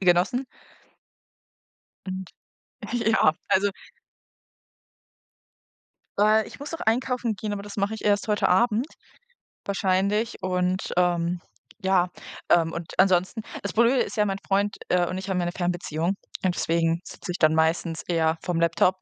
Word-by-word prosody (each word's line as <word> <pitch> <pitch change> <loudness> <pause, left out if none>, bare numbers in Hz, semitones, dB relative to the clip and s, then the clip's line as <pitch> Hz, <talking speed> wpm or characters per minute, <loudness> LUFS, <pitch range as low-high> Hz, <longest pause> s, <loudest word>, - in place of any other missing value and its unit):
genossen. 185 +8 +3 1.6
Und 185 0 -4 0.7
ja, 220 -9 +3 0.2
also 200 +2 +3 2.5
Äh, 215 0 +4
ich - - -12
muss 285 +2 -7
noch 330 - -5
einkaufen 245 0 0
gehen, 210 +1 -4
aber 200 - -5
das 205 0 -9
mache 200 +2 0
ich 220 - -7
erst 205 0 +2
heute 210 -1 +2
Abend 225 +5 +3 0.8
wahrscheinlich. 200 +2 0
Und, 185 0 -1
ähm, 175 0 +1 0.4
ja, 185 -2 +3 0.4
ähm, 165 -1 +4
und 170 -1 -6
ansonsten 185 +3 +3 0.2
das 200 - -4
Blöde 235 +4 +4
ist - - -4
ja, 210 - +3
mein 195 -1 -1
Freund, 200 +1 +1
äh, 180 -1 +3
und 185 - -3
ich 190 +1 -6
haben 185 -1 0
ja 175 - 0
'ne 175 - -1
Fernbeziehung 175 0 -1 0.3
und 180 -1 +1
deswegen 165 0 +1
sitze 185 - -7
ich 175 - -4
dann 155 -1 +5
meistens 160 +1 +1
eher 165 -2 +1
vorm 175 -2 -1
Laptop 170 +3 +3
185 Hz, 145 wpm, -25 LUFS, 175-210 Hz, 2.5 s, dann